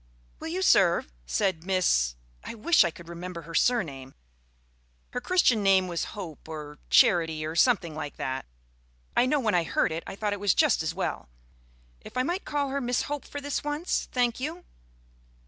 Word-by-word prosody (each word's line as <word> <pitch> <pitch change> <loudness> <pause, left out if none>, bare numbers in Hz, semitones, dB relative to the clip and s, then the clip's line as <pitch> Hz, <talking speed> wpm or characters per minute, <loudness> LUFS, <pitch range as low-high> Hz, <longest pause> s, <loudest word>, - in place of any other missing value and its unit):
_) - - -33 0.4
"Will - - -6
you 365 +3 -2
serve?" 170 - +4
said 160 - 0
Miss 175 - +2 0.3
I - - -7
wish 330 +8 +4
I 170 - +1
could 170 0 -13
remember 170 0 -7
her 165 +2 -10
surname. 145 - 0 1.0
Her 250 - -3
Christian 250 - +3
name 190 -2 +4
was 175 +3 -4
Hope 165 -5 -8
or 150 -2 -7
Charity 160 -3 +4
or 160 +1 -4
something 190 -6 +3
like 150 -2 -6
that; 130 0 -4 0.7
I 250 - +4
know, 295 +2 +2
when 225 -5 0
I 175 - +4
heard 160 - +1
it, 160 +1 -4
I - - -6
thought 205 0 -1
it 205 - -5
was 200 -2 +2
just - - +3
as 160 +1 -2
well. - - -3 0.7
If - - -10
I 255 - +3
might 350 +8 -2
call 285 -2 -1
her 280 +1 -2
Miss 245 0 0
Hope 290 -1 -4
for 290 - -6
this 285 0 -3
once? 295 +4 -2
Thank 245 -2 +1
you. 320 +7 -5
190 Hz, 190 wpm, -27 LUFS, 160-255 Hz, 1.0 s, serve